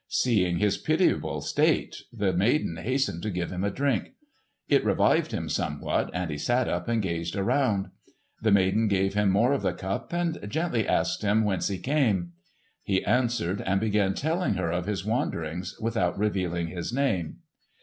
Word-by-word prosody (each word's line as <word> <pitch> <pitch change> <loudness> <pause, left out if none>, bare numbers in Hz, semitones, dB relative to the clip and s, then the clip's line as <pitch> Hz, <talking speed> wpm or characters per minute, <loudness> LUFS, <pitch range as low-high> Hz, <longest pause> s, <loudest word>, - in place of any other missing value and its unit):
Seeing 95 -8 +2
his 105 +2 +1
pitiable - - +1
state, - - 0
the 105 -5 0
maiden 95 - +1
hastened 130 -1 -1
to 105 - -2
give 90 -3 -3
him 90 +1 -3
a 100 - +1
drink. 135 - -1 0.5
It - - +3
revived - - +2
him - - -3
somewhat, 75 -1 -1
and 90 -2 -3
he 75 - -4
sat 120 - +1
up - - -2
and 115 -2 +1
gazed 85 -2 -3
around. 100 0 +1 0.5
The 110 - +2
maiden 100 +3 +3
gave 95 -1 +1
him 105 -1 +2
more 115 +8 +3
of 140 - 0
the - - 0
cup 95 +1 -4
and 175 -1 -1
gently 140 - 0
asked - - +1
him 105 +2 +2
whence 100 -4 0
he 100 - -2
came. 105 - +1 0.5
He 95 -1 0
answered 120 -7 +1
and 95 0 +1
began 105 -2 +1
telling 160 - 0
her 85 -3 -1
of 90 +1 -2
his 100 -2 -2
wanderings 90 -6 -2
without 100 -6 0
revealing 90 -5 -1
his 85 +3 -4
name. 120 - -1
100 Hz, 170 wpm, -27 LUFS, 90-120 Hz, 0.5 s, It